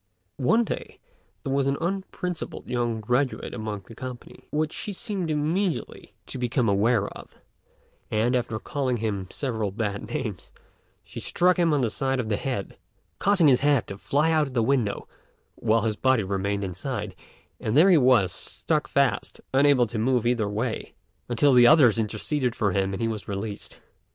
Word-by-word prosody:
One 220 - +3
day - - -6 0.5
there 135 - -2
was 140 0 +1
an 140 0 +1
unprincipled 180 -1 -4
young 120 -2 -1
graduate 125 +5 -1
among 110 -3 -4
the 115 - -12
company, 125 +1 -9
which 155 +1 -1
she 205 - -5
seemed 185 -3 -3
immediately 160 +5 -2
to 130 - -7
become 125 0 0
aware 100 +1 +2
of; - - -12 0.7
and, 115 +4 +1
after 120 -3 -1
calling 130 +1 -2
him 100 -4 -3
several 110 -7 -2
bad 100 0 -3
names, 120 -11 -4 0.5
she - - -9
struck 180 +1 +2
him 170 -2 +3
on 145 -2 +2
the 115 -3 0
side 135 +2 -1
of 115 -3 -2
the 105 - +1
head, 125 -8 -4 0.4
causing 195 -5 +4
his 130 -3 +5
head 145 -4 +2
to 100 - -6
fly 150 +8 +1
out 155 -2 +2
of 135 - -10
the 115 - +3
window 115 -5 0 0.5
while 110 +1 +1
his 110 -1 -1
body 130 -4 +3
remained 100 +1 -1
inside; 100 +2 -4 0.5
and 110 +5 0
there 185 +5 +7
he 175 - +7
was, 125 -8 +4
stuck 150 - -2
fast, 140 -2 0
unable 135 -2 +5
to 115 0 -4
move 125 0 +1
either 120 -4 +1
way, 110 +3 -3 0.3
until 130 +4 +3
the 120 -1 +7
others 125 -8 +6
interceded 120 +4 -1
for 100 -3 +1
him 95 +1 0
and 95 - -3
he - - +1
was 110 -2 -4
released. 100 +1 -6
125 Hz, 175 wpm, -25 LUFS, 110-145 Hz, 0.7 s, there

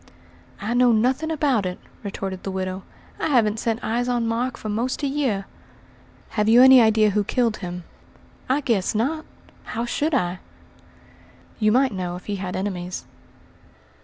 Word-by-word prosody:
"I 210 +4 -2
know 245 0 +5
nothing 255 +8 +1
about 285 -8 +1
it," 180 -1 -3 0.2
retorted 195 -2 -5
the - - -5
widow. 185 0 -3 0.4
"I - - 0
haven't 225 -7 +2
set 225 -1 0
eyes 245 +2 -1
on 240 -1 0
Mark 235 +2 -1
for - - -7
most 235 +7 -2
a - - +2
year." 265 -9 -1 0.8
"Have 210 0 0
you 240 +3 +8
any 260 -1 +9
idea 220 -1 +4
who 210 +1 +1
killed 230 0 0
him?" 180 -1 -6 0.7
"I 275 +3 +2
guess 225 -6 0
not! 300 +9 -1 0.4
How 230 +1 -4
should 295 +5 0
I?" 180 -7 0 1.2
"You 215 -1 +3
might 260 +2 +3
know 180 -2 -3
if 180 - -10
he 205 -1 -3
had 185 -1 -4
enemies." 185 -2 -4
225 Hz, 160 wpm, -23 LUFS, 195-250 Hz, 1.2 s, any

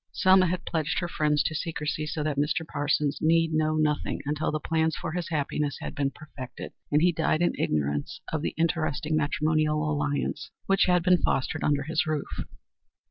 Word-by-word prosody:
Selma 185 0 +5
had 180 0 -2
pledged 160 -1 -1
her 175 - 0
friends 150 -3 +1
to 155 - -1
secrecy, 155 -1 -3
so 150 0 -2
that 150 -1 -1
Mr. 150 +3 0
Parsons 145 -1 0
need 165 0 +3
know 155 0 +2
nothing 150 -1 0
until 150 +2 -1
the 155 - -1
plans 160 +1 0
for 170 - -4
his 175 +1 -3
happiness 150 -2 -1
had - - -5
been 140 -1 0
perfected, 135 -3 -9 0.2
and 150 +2 +4
he 180 - +5
died 160 0 +1
in 175 - +2
ignorance 75 -1 -1
of 160 - 0
the - - -3
interesting 160 -2 0
matrimonial 155 0 +1
alliance 145 -1 -2 0.2
which 195 -1 +3
had 180 -2 +3
been 180 0 +4
fostered 145 +4 0
under 145 -2 +2
his 160 +2 0
roof. 155 -2 -3
155 Hz, 185 wpm, -27 LUFS, 150-165 Hz, 0.2 s, Selma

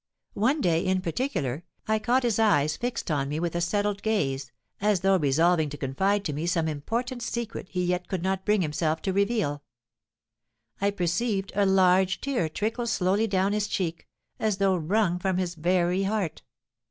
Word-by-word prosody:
One 265 +9 +1
day, 170 -6 +2
in 185 0 +1
particular, 165 - -2 0.2
I 220 0 +2
caught 245 +4 +2
his 230 -3 +1
eyes 155 -9 +3
fixed 245 -7 -3
on 140 -2 0
me 150 +2 -2
with 170 0 -2
a 175 - 0
settled 205 +3 0
gaze, 135 - -1 0.3
as 205 -3 +2
though 195 0 +3
resolving 160 +2 +3
to 145 - -7
confide 195 +10 0
to 150 - -1
me 155 +4 -3
some 165 -2 +1
important 235 - -3
secret 235 -4 -4
he 180 0 -1
yet 180 0 -1
could 185 -3 -3
not 190 0 -1
bring 210 -2 +2
himself 155 +1 -1
to 190 - 0
reveal. 200 -8 0 1.2
I 200 - +3
perceived 195 +2 -1
a 200 0 +2
large 190 0 +4
tear 255 - -1
trickle 225 +8 -2
slowly 205 +1 +1
down 195 0 +1
his 210 0 0
cheek, 170 -5 -3 0.3
as 215 -3 0
though 195 -1 +3
wrung 180 +2 +1
from 190 0 0
his 180 -2 -1
very 180 +2 +1
heart. 195 -4 -1
190 Hz, 175 wpm, -27 LUFS, 165-210 Hz, 1.2 s, large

